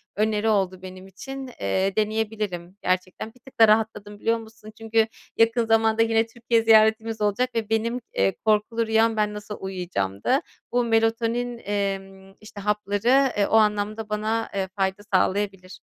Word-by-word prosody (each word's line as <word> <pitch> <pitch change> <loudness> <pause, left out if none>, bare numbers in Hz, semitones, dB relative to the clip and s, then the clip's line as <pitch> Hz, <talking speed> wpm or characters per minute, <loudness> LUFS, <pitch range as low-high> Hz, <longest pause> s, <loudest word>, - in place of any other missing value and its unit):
öneri 215 +1 +1
oldu 190 -3 0
benim 185 0 -10
için. 270 +8 -8
Eee, 190 - 0
deneyebilirim 210 -4 -2
gerçekten. 185 +4 -2
Bir 250 - -23
tık 265 0 -18
da 225 - +8
rahatladım 210 -1 0
biliyor 230 +2 +1
musun? 220 -1 -13
Çünkü 225 0 +1 0.3
yakın 230 +1 +3
zamanda 225 0 +3
yine 225 0 +2
Türkiye 230 0 0
ziyaretimiz 220 0 +4
olacak 210 +5 +1
ve 225 -2 -2
benim, 230 +2 0
eee, 95 0 +1
korkulu 220 +2 +1
rüyam 225 0 +2
ben 210 -1 +1
nasıl 210 0 -7
uyuyacağımdı. 180 - -1 0.3
Bu 245 0 +2
melatonin, 230 +1 0
emm, 195 -1 -4
işte, 215 -1 -10
hapları, 210 +6 +2
eee, 200 - +2
o - - +1
anlamda 215 0 +1
bana, 215 +2 -1
eee, 190 -1 -1
fayda 190 0 -1
sağlayabilir. 190 0 0
215 Hz, 150 wpm, -24 LUFS, 195-225 Hz, 0.3 s, da